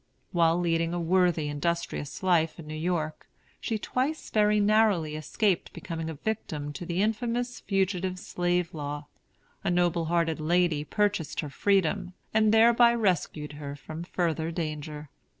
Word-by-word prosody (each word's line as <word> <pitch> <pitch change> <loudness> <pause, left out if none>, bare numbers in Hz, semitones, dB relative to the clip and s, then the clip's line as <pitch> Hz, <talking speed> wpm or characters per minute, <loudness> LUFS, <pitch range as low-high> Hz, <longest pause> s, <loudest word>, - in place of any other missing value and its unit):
While 165 -1 +3
leading 165 0 +1
a - - -1
worthy, 175 -2 +2
industrious 145 +1 -3
life 170 -4 +2
in 165 - -9
New 155 - -7
York, 155 -1 -2 0.3
she 225 - -2
twice 265 +8 -2
very 210 -1 +3
narrowly 205 -7 +3
escaped 185 +5 0
becoming 165 -3 -5
a 160 - -5
victim 150 -6 -4
to 175 - -7
the 180 +3 +1
infamous 240 +3 -1
Fugitive 190 -2 0
Slave 175 -1 -1
Law. 145 -1 -5 0.6
A - - 0
noble 175 -1 +2
hearted 165 -1 +1
lady 165 -1 +2
purchased 200 0 0
her 150 -3 -6
freedom, 185 +1 +1 0.2
and 215 -1 +4
thereby 235 +1 +6
rescued 175 -8 0
her 140 -1 -5
from 155 +3 -7
further 165 -2 -1
danger. 155 -3 -5
175 Hz, 145 wpm, -28 LUFS, 155-200 Hz, 0.6 s, thereby